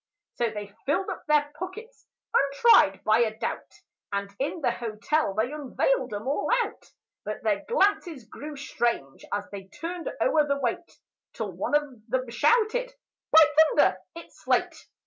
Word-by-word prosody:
So 235 -1 +1
they 205 -2 -7
filled 375 +7 0
up - - -8
their 295 -1 +3
pockets, 435 +7 -8 0.3
untried 280 +5 +4
by 215 +1 +4
a 220 -2 +1
doubt, - - -4 0.4
And 200 0 -3
in 285 +5 -2
the - - +2
hotel 230 +1 -1
they 220 +5 0
unveiled 305 - 0
'em 210 +4 -5
all 280 - -1
out; 425 - -10 0.3
But 215 +4 -5
their 210 -3 0
glances 390 - +1
grew 295 +7 -9
strange 235 - -2
as 205 0 -1
they 195 -1 -8
turned 335 - -5
o'er 310 -11 +3
the 280 0 +1
weight, 270 +5 -3 0.4
Till - - -4
one - - -1
of 295 - +4 0.3
them 255 +1 -1
shouted, 475 - +2 0.4
"By 320 0 +9 0.3
thunder, - - +4 0.2
it's 335 - -12
slate!" - - 0
280 Hz, 155 wpm, -26 LUFS, 220-340 Hz, 0.4 s, By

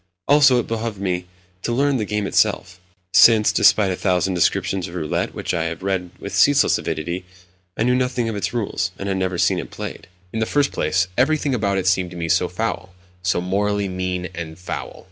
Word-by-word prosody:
Also, 140 -3 +6
it 120 - 0
behoved 115 -1 -3
me 90 -2 -2 0.3
to 120 - -2
learn 140 +3 +2
the 110 - -1
game 105 0 -2
itself; 95 -1 0 0.3
since, 110 -2 +6
despite 100 -3 +4
a - - -1
thousand 95 0 0
descriptions 90 +1 0
of 85 - -10
roulette 80 -4 -2
which - - -3
I 80 -1 0
had 85 +2 -5
read 95 -2 -1
with - - -7
ceaseless - - +4
avidity, 85 +4 -3 0.5
I - - +1
knew 125 +1 +3
nothing 125 -2 0
of 110 - -3
its 100 - -2
rules, 100 -5 -2
and 100 - -5
had 95 -1 -1
never 95 -1 -1
even - - +2
seen - - +2
it - - -6
played. - - -7 0.3
In 110 - -2
the 110 - 0
first 145 -1 +1
place, 85 +3 0
everything 145 +1 +2
about 100 -5 0
it 95 - -1
seemed 90 -1 +2
to 90 - -10
me 85 -1 -3
so 90 +1 +3
foul—so 90 -3 -4
morally 100 +2 0
mean 90 -1 -3
and 80 -1 -7
foul. 90 - -6
95 Hz, 205 wpm, -21 LUFS, 90-110 Hz, 0.5 s, Also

